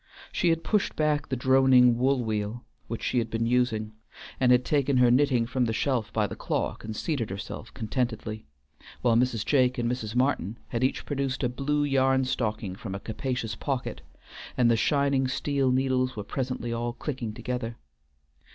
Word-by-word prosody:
She 175 - +1
had 165 0 +1
pushed 210 -2 0
back 150 -2 0
the 130 - 0
droning 130 -1 +5
wool 130 +1 +2
wheel 110 +1 -3 0.2
which 115 - -5
she 125 - +1
had 115 -1 -2
been 115 0 -1
using, 115 -3 +1 0.5
and 125 -1 +4
had 125 0 +4
taken 140 -2 +2
her 125 -1 +5
knitting 125 -2 +3
from 125 +1 0
the 110 - -1
shelf 125 -1 0
by 110 -2 +1
the - - -5
clock - - -2
and 110 0 -5
seated 130 -4 -2
herself 100 +3 -7
contentedly, 110 - -3 0.6
while 120 -2 +4
Mrs. 120 -2 +1
Jake 130 -3 +3
and 120 -1 0
Mrs. 120 -2 -3
Martin 125 -5 +1
had 120 0 -1
each 130 - 0
produced 135 -2 -2
a 125 - +2
blue 145 +4 0
yarn 135 -2 +2
stocking 110 -6 -2
from 100 -1 -6
a - - -4
capacious 115 +1 -3
pocket, 130 +2 -3 0.6
and 120 -2 +4
the - - +4
shining 140 +2 +2
steel 135 0 0
needles 130 -1 +1
were 105 - -4
presently 125 0 -3
all 120 +1 -2
clicking 120 -3 -4
together. 120 0 -4
125 Hz, 180 wpm, -27 LUFS, 115-135 Hz, 0.6 s, droning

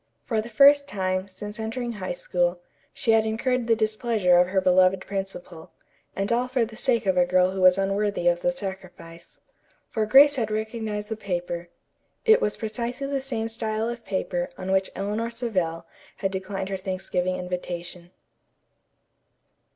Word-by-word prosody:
For 225 -3 0
the 225 - -9
first 280 +5 +6
time, 185 -3 -2
since 210 +3 -9
entering 235 +2 -3
High 235 - -4
School, - - -1 0.3
she 235 - 0
had 225 0 +5
incurred 235 +2 -1
the 225 - +4
displeasure 215 -4 +2
of 180 - +4
her 190 +1 +1
beloved 185 0 +4
principal, 190 -4 -6 0.5
and 195 +2 -1
all 245 +2 +1
for 250 -2 +1
the 220 0 -11
sake 235 -2 0
of 190 -1 +1
a 180 - +6
girl 185 +1 +3
who 190 0 -3
was 185 0 +6
unworthy 195 -1 0
of 175 0 +3
the 265 - +1
sacrifice. 185 -7 -9 0.5
For 215 -1 0
Grace 280 +4 +7
had 225 -4 -1
recognized 215 -1 -3
the 220 - -2
paper. 175 -4 -4 0.6
It 445 -1 +6
was 210 - 0
precisely 235 +4 -4
the 275 -1 -2
same 235 -4 -3
style 225 0 -2
of 240 -1 -6
paper 185 -3 -2
on 190 - -4
which 190 0 +2
Eleanor 210 +4 -2
Savell 185 -9 -2 0.3
had 195 -1 -1
declined 190 0 -4
her 195 - -2
Thanksgiving 185 -1 -2
invitation. 180 -1 -5
210 Hz, 165 wpm, -25 LUFS, 185-235 Hz, 0.6 s, Grace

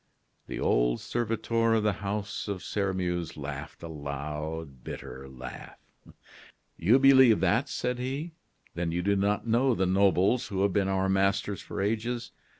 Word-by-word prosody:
The - - -5
old - - +2
servitor 115 0 0
of 110 - +1
the 105 -1 +2
house 100 +1 -3
of 100 -3 -4
Sairmeuse 90 -5 -2
laughed 70 +1 -7
a - - -5
loud, 75 -1 -5
bitter 65 +1 -8
laugh. 65 -1 -9 1.0
"You 105 +10 +4
believe 130 -5 +7
that!" 105 +9 +2
said 125 0 -2
he; 135 +7 -3 0.4
"then 85 0 -2
you 90 +1 -1
do 100 +1 +2
not 100 +2 +1
know 120 +2 +3
the 95 - +1
nobles 100 +6 +3
who 95 -3 -1
have 100 -2 +2
been 100 -2 +2
our 95 0 +1
masters 100 +1 +1
for - - -6
ages. 115 +3 -2
100 Hz, 150 wpm, -28 LUFS, 85-115 Hz, 1.0 s, believe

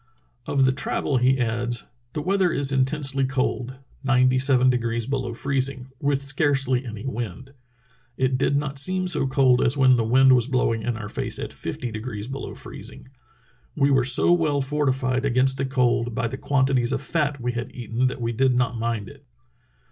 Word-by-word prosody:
Of 135 -2 +2
the 130 - +4
travel 135 +1 -1
he 130 +2 +3
adds: 120 0 -2 0.3
The 150 - -3
weather 190 0 +2
is 140 -2 +1
intensely 135 0 +1
cold, 130 -1 -2 0.3
ninety 130 -1 +3
seven 130 -1 +4
degrees 115 -2 -1
below 130 -3 -3
freezing, 135 0 -2
with 140 -1 0
scarcely 135 -2 +1
any 110 -2 -7
wind. 120 +1 -5 0.6
It 130 0 +1
did 140 +2 +1
not 140 -1 -1
seem 185 +5 +1
so 175 -6 0
cold 130 -2 +3
as 130 +4 +1
when 130 -2 +5
the 115 - +1
wind 130 +3 +5
was 125 -1 +3
blowing 125 -4 0
in 120 +1 -2
our 105 -2 -6
face - - -2
at - - -5
fifty 120 - -5
degrees 110 -1 -6
below 135 +1 -6
freez - - -9
ing. - - -15 0.7
We 140 -1 +2
were 135 -2 +4
so 130 +7 +4
well 155 -5 +1
fortified 135 -2 0
against 130 0 +2
the 135 - 0
cold 120 -3 0
by 115 - 0
the 125 - -5
quantities 130 -3 +1
of - - -2
fat 145 -2 -1
we 125 0 -2
had 120 0 -5
eaten 120 +1 -1
that 125 - -4
we 115 0 -1
did 130 +2 +2
not 125 -1 +1
mmd 115 -3 -3
It. - - -15
130 Hz, 185 wpm, -24 LUFS, 120-135 Hz, 0.7 s, when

